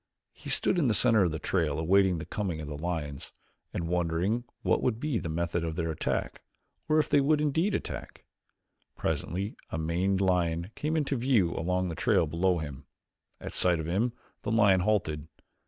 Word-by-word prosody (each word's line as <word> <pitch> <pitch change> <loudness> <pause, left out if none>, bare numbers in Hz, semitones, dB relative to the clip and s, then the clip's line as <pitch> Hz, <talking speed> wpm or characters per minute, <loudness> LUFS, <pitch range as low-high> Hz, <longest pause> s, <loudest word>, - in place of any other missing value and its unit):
He - - -10
stood 180 - +2
in 145 - +2
the 110 - +3
center 115 -2 +4
of 90 - +3
the 80 - -3
trail 80 -2 0
awaiting 95 +2 +3
the 80 - -5
coming 90 -2 -3
of 75 - -6
the 75 - -5
lions 75 -3 -4 0.4
and 85 - -3
wondering 90 +7 0 0.2
what - - +2
would 115 -3 0
be 145 -4 -1
the 85 - -5
method 85 +1 -1
of 80 -1 -3
their 80 -1 -1
attack 80 - -2 0.5
or 155 - +4
if 155 - +3
they 145 -1 +4
would 150 +2 +3
indeed 160 +7 +1
attack. - - -6 0.7
Presently 95 +4 -2
a - - -3
maned 90 +4 0
lion 90 -1 +1
came 155 +2 -1
into 145 -2 0
view 115 -9 +2
along 90 +2 -1
the - - -3
trail 80 - +3
below 85 +4 +1
him. 70 -5 -7 0.5
At - - -7
sight 90 -2 +2
of 80 - -3
him 105 +9 0 0.3
the - - -4
lion 100 -4 +5
halted. 90 -7 0
90 Hz, 190 wpm, -29 LUFS, 80-110 Hz, 0.7 s, lion